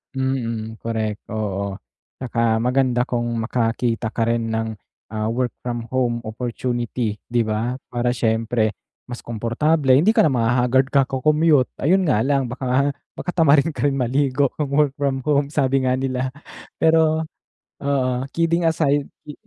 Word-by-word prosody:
Mm, 115 -4 -2
correct, 110 -2 -2
oo. 100 -2 -3 0.4
Tsaka 115 -3 +1
maganda 125 -1 +2
kung 120 -2 -2
makakita 115 0 -1
ka 115 +1 -1
rin 115 0 0
ng, 110 0 -2 0.4
ah, 110 0 -2
work 120 +1 -1
from 120 -1 -4
home 120 -2 0
opportunity, 120 -1 -3
'di 120 0 +1
ba? 110 +3 -2 0.2
Para 120 0 0
siyempre 115 -1 +1 0.3
mas 120 -1 -7
komportable, 130 +6 0
hindi 175 - +4
ka 220 - +5
na 150 - +3
ma-hahaggard 125 +2 +2
kaka-commute 140 +1 +3
ayun 185 +7 +3
nga 115 -3 +2
lang 135 -3 +1
baka 130 +2 0 0.2
baka - - -6
tamarin 160 -3 +4
ka 145 - -3
rin 140 - +2
maligo 135 +1 +1
kung 150 - 0
work 140 -2 +2
from 135 -2 -1
home 145 +1 +2
sabi 135 -2 +1
nga 125 - +2
nila. 130 -1 -2 0.5
Pero, 160 -1 +3 0.6
oo, 135 -2 +1 0.2
kidding 170 +1 +1
aside, 145 -3 +2 0.2
i 150 - -6
125 Hz, 145 wpm, -21 LUFS, 115-140 Hz, 0.6 s, ka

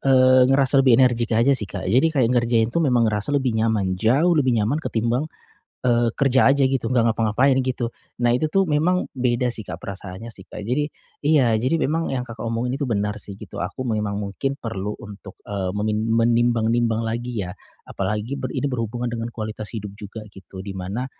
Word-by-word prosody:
eee, 130 -1 +5
ngerasa 135 0 +4
lebih 130 -3 +5
energik 120 -3 +3
aja 125 +5 +4
sih, 105 -8 -1
Kak. 95 -2 -5
Jadi 125 - +3
kayak 130 -6 +1
ngerjain 120 -1 +2
tuh 170 - +1
memang 125 -6 +3
ngerasa 105 +3 -2
lebih 135 -4 +1
nyaman, 110 -4 +1
jauh 130 - +3
lebih 130 -7 +2
nyaman 115 +9 0
ketimbang, 120 +4 -1 0.6
eee, 120 -1 +3
kerja 135 -1 +4
aja 140 0 +4
gitu, 130 -3 0
enggak 115 -2 +3
ngapa-ngapain 115 +5 +2
gitu, 125 -2 -2 0.3
nah 120 - +4
itu 155 +5 +1
tuh 195 +4 +2
memang 175 +3 +1
beda 125 -1 0
sih 115 - -5
Kak, 80 - -4
perasaannya 100 +4 -8
sih, 95 - -11
Kak. 105 - -8
Jadi 140 +7 0 0.3
iya, 145 -5 +3
jadi 130 +7 +1
memang 165 +1 0
yang 125 -2 -2
Kakak 115 -2 -10
omongin 115 +2 -2
itu 140 - -1
benar 105 -2 -1
sih 100 -1 -6
gitu, 105 -4 -9
aku 100 +9 -4
memang 105 -3 -1
mungkin 105 +7 -3
perlu 105 -4 -4
untuk, 100 -2 -11
eee, 95 -2 -3
memin 110 +1 -1
menimbang-nimbang 115 0 +2
lagi 115 -2 -3
ya. 90 - -6 0.3
Apalagi 105 +6 -3
ber - - -3
ini - - -1
berhubungan 120 -2 -2
dengan 115 0 -3
kualitas 110 -2 -6
hidup 105 -2 -6
juga 105 +1 -9
gitu, 95 0 -11
di 100 - -5
mana, 95 +6 -4
115 Hz, 195 wpm, -22 LUFS, 105-130 Hz, 0.6 s, eee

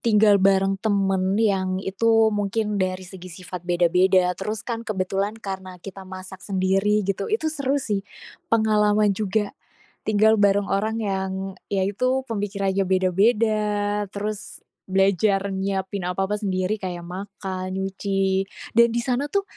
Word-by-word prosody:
tinggal 210 -2 +5
bareng 195 0 +3
temen, 195 -2 +1
yang 195 -4 +1
itu 225 +3 +3
mungkin 210 0 -1
dari 185 0 -1
segi 185 -1 -11
sifat 180 -1 -8
beda-beda, 180 +1 +3
terus 215 +3 -3
kan 235 -2 -3
kebetulan 195 +1 -1
karena 190 -4 -7
kita 195 -1 -9
masak 185 0 -9
sendiri 195 +2 +1
gitu, 195 +1 -2
itu 415 -8 0
seru 280 -2 0
sih. 210 -8 -1 0.5
Pengalaman 210 -2 +3
juga. 205 +1 -1 0.6
Tinggal 220 +1 +4
bareng 200 0 +3
orang 215 +3 0
yang 190 -2 -1 0.4
ya, 195 -1 0
itu, 255 +7 0
pemikirannya 200 -2 -1
beda-beda, 210 +4 +2 0.5
terus 210 0 -5 0.3
belajar 195 +1 +2
nyiapin 190 -1 -2
apa-apa 195 +3 -1
sendiri 190 0 -1
kayak 180 -3 -5
makan, 190 +1 -6
nyuci, 195 0 -1 0.3
dan 235 +1 +6
di 235 - 0
sana 255 +3 0
tuh 400 +7 0
195 Hz, 130 wpm, -23 LUFS, 190-215 Hz, 0.6 s, dan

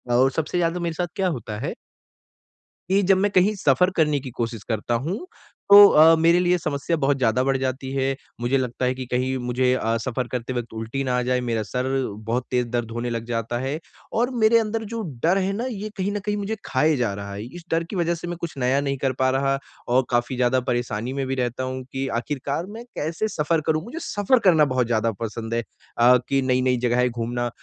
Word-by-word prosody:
और 130 +2 +4
सबसे 160 +4 -2
ज़्यादा 175 0 0
मेरे 170 -1 -2
साथ 175 +2 -2
क्या 190 -2 +1
होता 115 - -4
है - - -3 1.2
कि 195 +1 +4
जब 190 0 +4
मैं 200 +1 +1
कहीं 190 +3 +4
सफ़र 180 +1 +3
करने 150 -3 +3
की 130 -1 -7
कोशिश 115 -2 -3
करता 115 +1 -2
हूँ 200 - -3 0.4
तो 205 0 +11
अ, 160 0 +7
मेरे 165 +2 +4
लिए 180 0 +3
समस्या 155 +1 -2
बहुत 140 -1 +1
ज़्यादा 125 0 +2
बढ़ 135 0 +1
जाती 130 0 -3
है। 135 0 0 0.3
मुझे 125 +3 +2
लगता 125 0 -2
है 125 - +1
कि 130 -1 -5
कहीं 130 +1 0
मुझे 125 +1 +2
अ, 115 -2 0
सफ़र 125 +1 -3
करते 125 0 -3
वक़्त 120 -2 -4
उल्टी 115 +5 -3
न - - -5
आ 125 0 +1
जाए, 125 0 +1
मेरा 115 -3 -1
सर 125 +4 -3 0.4
बहुत 125 +2 0
तेज़ 125 -1 +1
दर्द 115 -1 -2
होने 120 +1 -3
लग 115 -1 -3
जाता 115 0 -2
है। 135 +4 -3 0.3
और 240 +3 +1
मेरे 230 +1 +6
अंदर 225 0 -2
जो 230 - -2 0.2
डर 180 +4 +4
है 195 0 0
ना 235 +5 -3
ये 215 -2 -5
कहीं 195 +2 -1
न 205 - -2
कहीं 210 0 0
मुझे 205 +2 -2
खाए 150 +4 +2
जा 120 -5 0
रहा 100 0 -6
है। 100 +2 -6
इस 170 +7 -10
डर 165 +1 +2
की 170 - -8
वज़ह 170 -1 +1
से 170 +1 -7
मैं 175 -1 -4
कुछ 165 -4 -5
नया 130 +2 +2
नहीं 140 -1 -2
कर 135 0 0
पा 130 0 +3
रहा 135 +1 +1 0.3
और 125 +1 +3
काफ़ी 120 +1 0
ज़्यादा 125 +1 +2
परेशानी 120 0 -2
में 135 -1 -2
भी 135 - -1
रहता 125 0 -2
हूँ 130 0 -4
कि 135 0 -2
आख़िरकार 145 +4 -3
मैं 240 - -9
कैसे 160 +8 -2
सफ़र 160 -3 0
करूँ? 155 +1 +1
मुझे 310 +8 -7
सफ़र 220 - +1
करना 160 -7 +5
बहुत 125 -2 +2
ज़्यादा 115 -1 +1
पसंद 115 +1 -4
है। 115 0 0 0.3
अ, 125 +2 +6
कि 135 -1 +2
नई-नई 130 -1 +2
जगहें 125 +1 +2
घूमना। 120 +1 -2
130 Hz, 230 wpm, -23 LUFS, 120-170 Hz, 1.2 s, तो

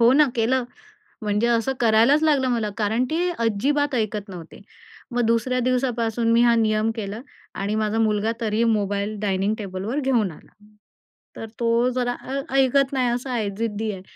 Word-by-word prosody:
हो 235 +2 +6
ना 295 0 +5
केलं. 245 +3 +1 0.6
म्हणजे 210 +2 0
असं 235 +3 +1
करायलाच 235 +7 +4
लागलं 280 -4 +2
मला, 225 -3 -1
कारण 220 +4 +1
ती 345 +3 0 0.2
अजिबात 280 +7 0
ऐकत 215 -3 -2
नव्हते. 175 -4 -10 0.5
मग 245 - -1
दुसऱ्या 230 +3 +1
दिवसापासून 240 -2 0
मी 230 - +4
हा 235 -1 +5
नियम 215 0 +1
केला 210 0 -5 0.3
आणि 200 +2 -2
माझा 215 +1 -1
मुलगा 215 0 +1
तरीही 220 0 0
मोबाईल 205 0 -1
डायनिंग 200 0 0
टेबलवर 200 +6 -4
घेऊन 240 -8 +1
आला. - - -17 0.8
तर 225 - -6
तो 235 +1 +2
जरा 245 -1 0 0.2
अ, 275 +1 -2
ऐकत 270 +1 +3
नाही 255 -2 +1
असं 245 +2 -2
आहे 220 -5 -1
जिद्दी 220 -1 -2
आहे. 185 - -8
230 Hz, 165 wpm, -23 LUFS, 210-255 Hz, 0.8 s, हो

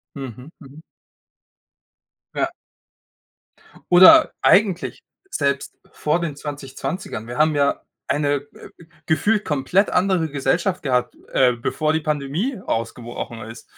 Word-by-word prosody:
Mhm. 135 +1 -8
Mhm. 145 +2 -14 1.5
Ja. 345 0 -1 1.4
Oder 185 - +8
eigentlich 195 -3 +2 0.3
selbst 140 - -1 0.2
vor 155 +3 0
den 160 -4 -3
2020ern 145 - -6
wir 120 +3 -6
haben 155 0 +3
ja 140 -1 +1 0.3
eine, 145 -1 0
äh, - - -13 0.4
gefühlt 205 +7 +1
komplett 160 +8 +1
andere 180 -3 +1
Gesellschaft 145 +7 -1
gehabt, 125 -3 0 0.2
äh, 125 -2 +4
bevor 155 +6 -1
die 160 - 0
Pandemie 155 - -2
ausgebrochen 115 0 -4
ist. 115 +2 -10
145 Hz, 110 wpm, -21 LUFS, 135-175 Hz, 1.5 s, Oder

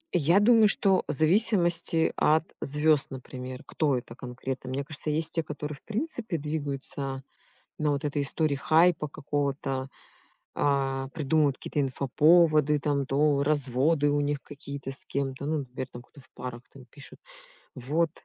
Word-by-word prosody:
Я 170 +4 +4
думаю, 220 0 +6
что 195 -2 +3
в - - -1
зависимости 170 - +3
от 155 +1 +3 0.2
звёзд, 150 +1 +2
например. 130 -1 -8
Кто 145 -5 0
это 120 -1 -8
конкретно. 130 0 -6
Мне 135 +2 -2
кажется 150 +1 -6
есть 160 +2 -1
те, 165 - +1
которые 150 -1 -6
в 140 - -19
принципе 225 - -3
двигаются 140 -2 -4 0.6
на 150 -1 +1
вот 140 +1 -3
этой 145 0 -1
истории 140 +1 0
хайпа 160 +2 +3
какого-то, 140 -2 -3 0.7
э, 135 -1 0
придумывают 150 -2 +1
какие-то 150 - -3
инфоповоды 150 +3 +3
там, 140 -2 0
то 140 0 +2
разводы 145 +1 +1
у 145 0 +1
них 145 -1 -1
какие-то 140 -1 -7
с 135 - -3
кем-то, 140 0 -3
ну 155 0 0
например, 130 -1 -6
кто 140 +3 -18
в - - -20
парах, 125 -2 -7
там, 135 -2 -14
пишут. 140 +4 -13 0.6
Вот. 155 +6 0
145 Hz, 150 wpm, -27 LUFS, 135-155 Hz, 0.7 s, думаю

